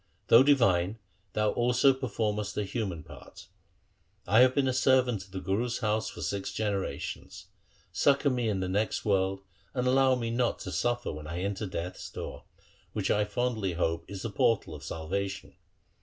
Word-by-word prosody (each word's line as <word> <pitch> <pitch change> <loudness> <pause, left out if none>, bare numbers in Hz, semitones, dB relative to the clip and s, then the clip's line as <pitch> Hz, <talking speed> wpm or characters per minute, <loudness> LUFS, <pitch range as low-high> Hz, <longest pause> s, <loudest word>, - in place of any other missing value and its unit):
Though 115 - +9
divine, 110 -8 +3 0.4
thou 105 0 +2
also 125 +3 +3
performest 105 -5 -2
a 105 - +1
human 95 -6 -3
part. - - -13 0.8
I 110 +5 +4
have 130 0 +6
been 140 -2 +2
a 130 - +1
servant 125 -5 +2
of 95 - -22
the 95 - -4
Guru's 105 +7 -1
house 110 -2 0
for - - -9
six 100 -1 -2
generations. 105 -3 -4 0.5
Succour 140 0 +3
me 120 -3 0
in 95 -3 -1
the 95 - -1
next 105 +5 -1
world, 95 -1 +1 0.3
and 125 - 0
allow 130 0 +4
me 115 -2 -2
not 120 0 +1
to - - -5
suffer 120 0 -1
when 75 0 -8
I 85 +3 -4
enter 100 +1 -2
death's 90 0 -5
door, - - -7 0.5
which - - 0
I 105 0 +2
fondly 110 -3 -1
hope 85 -1 -1
is 100 -2 -7
the 115 - -3
portal 100 -4 +1
of 75 -2 -9
salvation. 85 +6 -4
105 Hz, 170 wpm, -29 LUFS, 95-125 Hz, 0.8 s, Though